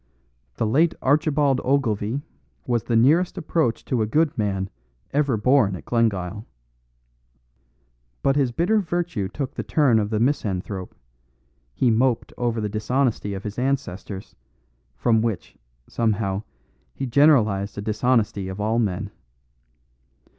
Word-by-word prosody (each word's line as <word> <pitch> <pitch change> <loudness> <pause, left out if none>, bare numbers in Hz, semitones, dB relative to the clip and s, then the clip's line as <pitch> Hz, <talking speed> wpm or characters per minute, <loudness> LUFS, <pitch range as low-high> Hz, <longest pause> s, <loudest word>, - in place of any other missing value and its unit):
"The - - -1
late 155 +10 +3
Archibald 145 -1 +2
Ogilvie 125 -1 0 0.4
was 120 -2 +1
the 120 - 0
nearest 155 +12 +3
approach 160 -7 -1
to 125 -3 0
a 110 - +1
good 155 +6 +1
man 95 -2 -2 0.4
ever 140 -5 +2
born 110 -3 +3
at - - -10
Glengyle. 105 -3 -1 1.8
But 135 - +3
his 135 -4 +2
bitter 180 - +2
virtue 170 - -2
took 135 +3 -4
the - - -4
turn 135 -8 +3
of 105 -1 -1
the 110 -1 0
misanthrope; 100 -7 -2 0.8
he 125 - +3
moped 120 +1 +1
over 120 -2 -1
the 105 - -1
dishonesty 110 0 -1
of 95 - -7
his 105 +2 -5
ancestors, 110 -7 -3 0.6
from 110 - +2
which, 115 -5 -3 0.3
somehow, 105 -4 -1 0.5
he 135 - -3
generalised 110 -8 +3
a - - -3
dishonesty 105 -2 0
of 95 +1 -6
all 110 +3 +1
men. 100 -2 -1
115 Hz, 130 wpm, -23 LUFS, 105-140 Hz, 1.8 s, late